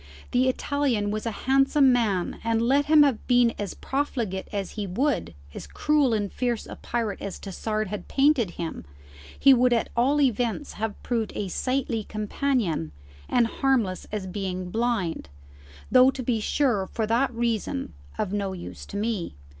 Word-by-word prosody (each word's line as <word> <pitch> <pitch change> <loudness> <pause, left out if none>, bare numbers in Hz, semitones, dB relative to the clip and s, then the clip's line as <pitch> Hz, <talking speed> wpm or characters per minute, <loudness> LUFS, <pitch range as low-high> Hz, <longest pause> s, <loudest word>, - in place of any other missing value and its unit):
The 255 +1 +3
Italian 255 -6 0
was 215 +2 -3
a - - 0
handsome 270 0 +4
man, 205 -7 0
and 230 0 +1
let 270 +5 +3
him 305 -1 +7
have 275 -6 0
been 245 -2 +4
as 205 -2 -4
profligate 240 -9 -2
as 200 -2 -3
he 210 -2 -4
would, 210 - -1 0.2
as - - -8
cruel 300 -4 +2
and 205 -3 -1
fierce 240 -3 -1
a - - -8
pirate 230 -4 -3
as 200 - -5
Tassard 215 +2 -3
had 210 +1 -6
painted 275 -7 +3
him, 165 -1 -4 0.5
he 275 - +7
would 250 0 +4
at 230 - 0
all 265 +5 +3
events 250 0 0
have 215 0 -4
proved 230 -3 -1
a 200 - -3
sightly 255 0 -1
companion, 215 - -1 0.4
and 240 - +3
harmless 230 -6 0
as 210 -3 -3
being 185 -1 -4
blind, 220 - -1 0.6
though 255 +1 +7
to 270 -1 -4
be 230 -2 0
sure 215 -4 +1
for 220 +2 -2
that 240 +4 +1
reason 230 - -2 0.2
of 200 -2 -2
no 200 -2 -1
use 175 -2 -8
to 200 - -6
me. 205 - -2
230 Hz, 165 wpm, -26 LUFS, 200-260 Hz, 0.6 s, him